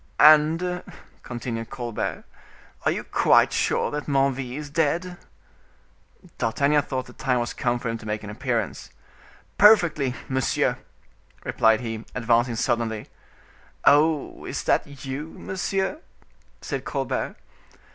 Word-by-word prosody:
"And," 160 +4 +5 0.4
continued 120 -2 -5
Colbert, 120 -4 -4 0.6
"are - - +4
you - - -3
quite - - +4
sure - - +1
Menneville 135 -3 0
is 150 -1 -7
dead?" 165 +3 0 1.2
D'Artagnan 140 +6 +2
thought 130 -2 -4
the 125 - -13
time 125 -1 0
was 120 0 -2
come 120 0 0
for 120 - -5
him 115 0 -3
to 110 - -10
make 105 0 -3
his 105 - -6
appearance. 120 +1 -3 0.7
"Perfectly, 170 - +5
monsieur;" 130 -1 0 0.6
replied 110 0 +3
he, 115 -2 -5
advancing 120 0 +2
suddenly. 115 -2 -1 0.8
"Oh! 150 +1 +3
is - - -4
that 140 -1 -1
you, 140 +4 -5
monsieur?" 190 - -2 0.6
said - - -4
Colbert. - - -2
130 Hz, 115 wpm, -24 LUFS, 120-150 Hz, 1.2 s, And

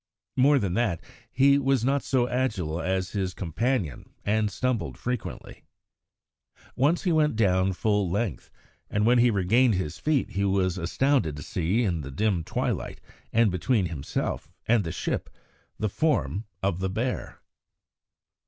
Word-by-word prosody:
More 140 +3 +5
than 100 -8 0
that, 105 -6 0 0.3
he 140 +2 +5
was 135 -3 +1
not 140 +1 +2
so 125 -2 +1
agile 105 -11 -1
as 95 +2 -1
his 95 -3 -2
companion, 95 - -2
and 105 0 +2
stumbled 125 +2 -2
frequently. 125 0 -5 1.1
Once 150 +6 +2
he 180 - +1
went 155 -5 +3
down 95 -3 +2
full 105 0 +1
length, 100 - -2 0.4
and 105 +1 +1
when 120 +1 +5
he 120 +1 +5
regained 110 +4 +3
his 85 -5 -3
feet 150 -3 0
he 100 - -1
was 95 -2 +1
astounded 90 - +1
to 75 - -7
see 95 - 0
in 85 -7 0
the 70 - -7
dim 95 +3 0
twilight, - - -2 0.3
and 115 -3 +4
between 95 +3 +1
himself 75 -5 -3 0.2
and 115 -2 +4
the 80 - -4
ship, 90 - -3 0.5
the 110 - 0
form 115 -4 0 0.2
of 95 -2 0
the 95 0 -1
bear. 115 +6 -3
105 Hz, 150 wpm, -26 LUFS, 90-125 Hz, 1.1 s, More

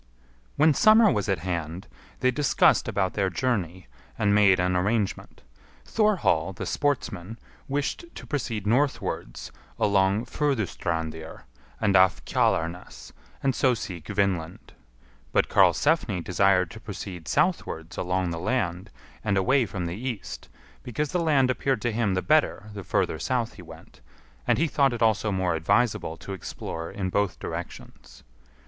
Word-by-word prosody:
When 155 +1 +5
summer 215 +4 +6
was 105 - -1
at 95 - +2
hand 85 0 -4 0.3
they 130 - +3
discussed 140 +1 +3
about 95 0 0
their 95 -2 0
journey, 95 - -2 0.3
and 105 -2 +2
made 100 -3 +5
an 90 0 +1
arrangement. 100 +2 -1 0.4
Thorhall 175 - +1
the - - -6
Sportsman 115 -8 -2 0.3
wished 145 - -2
to - - -9
proceed 115 -8 -3
northwards 125 - -1 0.3
along 100 +2 +2
Furdustrandir, 85 - -3 0.4
and 100 -2 +2
off 95 -1 +4
Kjalarnes, 85 +3 -1 0.3
and 135 -1 +2
so 125 0 +2
seek 90 -7 -7
Vinland; 90 -5 -2 0.6
but - - +2
Karlsefni 95 - +3
desired 95 0 +2
to 110 - -10
proceed 95 -6 -8
southwards 140 - -1
along 90 -1 -1
the 85 - -4
land 95 -2 -2 0.3
and 100 -3 +1
away 125 +5 +3
from 95 -2 -4
the 85 - -3
east, 115 0 -6 0.3
because 140 +5 -3
the 180 - 0
land 140 -6 +3
appeared 130 -3 -1
to 120 - +1
him 105 -4 0
the 95 - -1
better 150 -8 +1
the 100 -2 -7
further 80 - 0
south 120 +3 -1
he - - -12
went, - - -14 0.5
and - - +3
he 160 - +2
thought 140 -4 +2
it 120 -1 -1
also 110 -1 +2
more 95 -2 0
advisable 80 +1 +1
to 100 - -7
explore 85 -2 -6
in 95 -2 -4
both 100 -1 0
directions. - - -8
100 Hz, 145 wpm, -26 LUFS, 90-130 Hz, 0.6 s, summer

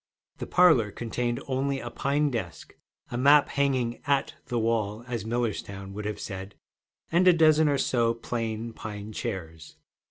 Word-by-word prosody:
The - - -5
parlor 160 - +5
contained 120 +4 -3
only 135 +1 -1
a - - -6
pine 145 +1 0
desk, 90 -9 -5 0.4
a 120 - -2
map, 145 +2 +6
hanging 130 -4 0
'at' 140 -1 +1
the 120 - -2
wall, 110 -1 0
as 120 -4 -4
Millerstown 100 -4 -3
would 105 +1 -6
have 105 0 -3
said, 95 0 -7 0.6
and 175 +3 +4
a 180 - +8
dozen 155 -2 +5
or 140 - +2
so 115 -3 +1
plain 115 -1 -4
pine 105 -1 -7
chairs. 80 -9 -6
120 Hz, 155 wpm, -27 LUFS, 105-140 Hz, 0.6 s, a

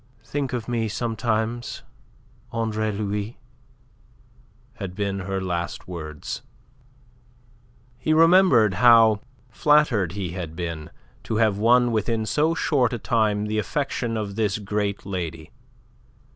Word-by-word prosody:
"Think 140 -3 -3
of 120 -3 -3
me 115 -2 -1
sometimes, 115 +1 -2 0.7
Andre 110 -1 -1
Louis," 105 +2 -3 1.4
had 95 -5 -6
been 100 -1 -2
her 95 +1 -3
last 85 -3 -3
words. 80 -4 -6 1.6
He 155 - -1
remembered 160 - +5
how 115 -3 +6 0.3
flattered 120 - +3
he 95 -4 -4
had 85 -3 -6
been 85 -3 -5 0.4
to 110 - -2
have 110 -2 +2
won 120 +2 +4
within 110 0 0
so 150 +10 +1
short 130 -7 +1
a - - -1
time 105 -2 +1
the 110 0 -1
affection 120 -2 -2
of 100 -2 -4
this 105 -2 0
great 105 -1 -2
lady. 85 -5 -5
110 Hz, 115 wpm, -24 LUFS, 100-120 Hz, 1.6 s, how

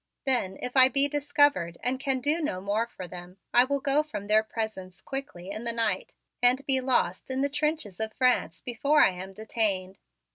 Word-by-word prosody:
Then, 240 -8 +1
if 250 +1 -4
I 260 -1 +8
be 275 +2 +3
discovered 290 - +1
and 255 +2 0
can 265 -1 -1
do 300 +5 +1
no 290 -12 -2
more 205 +4 -1
for 185 -6 -9
them, 180 +1 -11 0.2
I 245 +1 +6
will 280 +1 -1
go 280 +2 +2
from 215 -10 -7
their 215 +1 +4
presence 215 -5 -6
quickly 200 -8 -7
in 215 +3 -5
the 235 - 0
night 230 -1 -1 0.3
and 250 +3 +4
be 265 -1 +3
lost 245 -8 0
in 260 0 -1
the 280 - +1
trenches 295 - -2
of 220 0 -2
France 255 +2 +1
before 280 +5 +2
I - - +4
am 185 +1 -8
detained. 200 -3 -2
240 Hz, 195 wpm, -27 LUFS, 195-275 Hz, 0.3 s, I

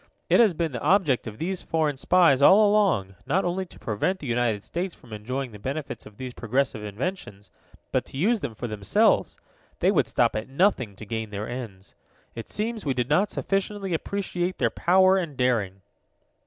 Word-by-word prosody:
"It - - +6
has 215 -7 +5
been 165 -1 -1
the 120 -3 -5
object 150 - +2
of 110 -1 -7
these 185 +5 -3
foreign 155 -3 0
spies, 140 -1 +4
all 205 +8 +7
along, 195 - +2
not 180 +7 +1
only 185 +2 -2
to - - -15
prevent 125 - -1
the 150 - -10
United 120 -4 0
States 175 +1 -4
from 120 -3 -14
enjoying 125 +5 -4
the 105 - -11
benefits 135 +7 -5
of 105 -1 -16
these 130 -1 -6
progressive 120 -2 -1
inventions, 105 - -5 0.4
but - - +1
to - - -10
use 215 - +2
them 125 - -5
for 120 - -6
themselves. 105 -3 +1 0.4
They - - +3
would - - +2
stop - - +1
at 110 +3 -4
nothing 135 - +1
to 110 - -10
gain 110 0 -4
their 105 +1 -5
ends. 115 -6 -8 0.4
It 115 - -8
seems 220 +1 -3
we 135 -3 -1
did 125 -1 -1
not 185 +7 +3
sufficiently 195 -1 -2
appreciate 185 +1 -2
their - - +1
power 185 +1 +4
and 165 -7 -3
daring." 110 -7 0
135 Hz, 190 wpm, -25 LUFS, 110-185 Hz, 0.4 s, all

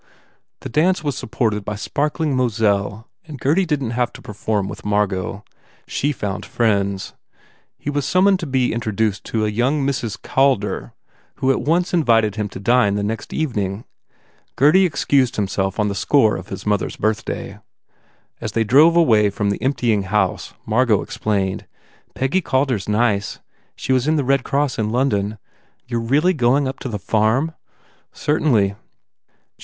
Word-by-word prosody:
The - - -6
dance 170 +8 +2
was 145 -3 -1
supported 110 -4 -1
by 105 +1 -4
sparkling 150 - -1
Moselle 110 -3 0 0.2
and 150 -4 -9
Gurdy 170 +9 +2
didn 140 -6 -1
t - - -4
have 120 0 0
to - - -11
perform 105 -1 -2
with - - -8
Margot. 105 -1 -1 0.4
She 145 - -1
found 105 -8 -4
friends. 100 -4 0 0.6
He 145 - -4
was 145 0 -1
summoned 185 +6 +3
to 165 - -5
be 130 -2 +1
in 115 - -1
troduced 110 -2 -1
to 110 -1 -1
a - - 0
young 135 +6 +1
Mrs. 120 -7 -2
Calder 105 - 0 0.4
who 135 0 +1
at - - 0
once 175 +4 +1
in 170 -2 +3
vited 115 -5 +3
him 105 -1 -2
to 95 - -9
dine 115 -1 +3
the 105 - -1
next 110 +2 -4
evening. 105 -8 -2 0.7
Gurdy 180 +7 +5
ex 155 - -4
cused 130 -4 +3
himself 95 0 -1
on 105 - +2
the 100 - -1
score 110 +4 +3
of 90 - -7
his 95 - -7
mother 105 -2 +1
s - - -8
birth 110 +1 0
day. 100 - -6 0.8
As - - -5
they 115 - +2
drove 145 +10 +5
away 110 -11 +4
from 100 0 -1
the 100 - -4
emptying 115 -6 +1
house 95 -3 -1
Margot 110 -2 +2
explained, 100 -3 -2 0.5
"Peggy 135 +9 0
Calder 130 -5 +1
s 100 +1 -8
nice. 105 -2 0 0.4
She 130 - -1
was 130 +1 +1
in 155 - +3
the 145 - +1
Red 135 0 +2
Cross 140 -3 -1
in 105 -1 0
London. 110 -4 0 0.5
You 120 -2 -2
re 115 - -5
really 180 +5 +3
going 135 -1 +2
up 130 - -5
to 130 - -5
the 105 - -3
farm? 110 - +1 0.6
"Certainly." 120 -10 +1
115 Hz, 175 wpm, -20 LUFS, 105-140 Hz, 0.8 s, Gurdy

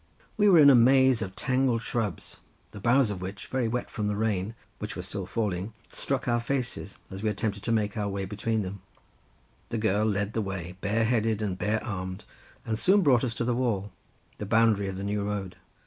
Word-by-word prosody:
We 210 -1 +4
were 180 - +7
in 145 -3 +9
a - - +7
maze 130 0 +5
of 95 -2 -4
tangled 130 -2 +1
shrubs, 110 -9 -3 0.3
the 105 - -9
boughs 120 +2 +3
of 95 -3 -5
which, 95 +2 -6
very 130 -3 -1
wet 120 +2 -2
from 105 -2 -2
the 105 - 0
rain 105 0 -1 0.2
which - - -5
was - - -6
still 100 -3 -5
falling, 100 0 -2 0.2
struck 135 -1 -2
our 120 -1 +2
faces, 120 -5 -3
as 95 +1 -6
we 110 - +1
attempted 100 0 -2
to 115 - -2
make 105 -2 +1
our 105 -2 -1
way 100 -1 -3
between 105 +2 -1
them; 95 0 -6 0.9
the 115 - -2
girl 110 0 +1
led 100 0 -1
the 110 - 0
way, 95 -3 -5
bare 110 +3 +1
headed 110 -2 +1
and 100 -3 -1
bare 110 +1 0
armed, 95 -4 -5 0.4
and 110 -1 -2
soon 195 +1 +4
brought 130 -5 +4
us 120 -2 -1
to - - -1
the 120 - +1
wall, 110 -5 -1 0.5
the 105 - -3
boundary 110 -2 +3
of 95 -1 -4
the 95 - -5
new 100 +1 -1
road. 100 -2 -3
110 Hz, 210 wpm, -28 LUFS, 100-120 Hz, 0.9 s, in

